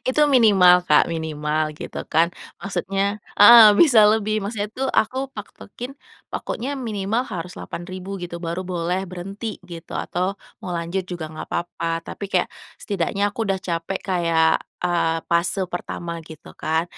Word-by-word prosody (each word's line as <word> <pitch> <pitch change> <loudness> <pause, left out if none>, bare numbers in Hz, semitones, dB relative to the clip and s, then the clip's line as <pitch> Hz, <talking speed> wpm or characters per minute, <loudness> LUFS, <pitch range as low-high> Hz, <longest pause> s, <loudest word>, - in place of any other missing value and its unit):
Itu 260 +4 +1
minimal 195 -7 +7
Kak, 150 - +6
minimal 155 -1 -2 0.2
gitu - - -7
kan, 165 +1 +4 0.3
maksudnya 195 0 -2 0.4
heeh, 230 +2 +10 0.2
bisa 285 -9 +6
lebih, 215 0 +1
maksudnya 205 0 -3
tuh 265 +1 -1
aku 235 +4 -4 0.2
patokin 210 +3 -9 0.4
pokoknya 255 +5 -4
minimal 220 -1 -1
harus 180 0 -5
8.000 185 +2 -7
gitu 175 -1 -5
baru 170 +2 -3
boleh 180 +1 -1
berhenti 195 +5 -7 0.2
gitu 165 -1 -9
atau 180 +1 -2 0.3
mau 185 - -6
lanjut 170 +3 -2
juga 175 -2 -4
nggak 155 - -7
apa-apa, 170 -1 -3 0.2
tapi - - -6
kayak - - +2 0.3
setidaknya 200 0 -2
aku - - -20
udah 195 -1 0
capek 170 +3 -2
kayak, 170 -3 +2 0.4
eee, 170 -2 +1
fase 170 +3 +1
pertama 175 -1 -5 0.2
gitu 160 -2 -12
kan. 160 +1 +1
185 Hz, 145 wpm, -22 LUFS, 170-205 Hz, 0.4 s, heeh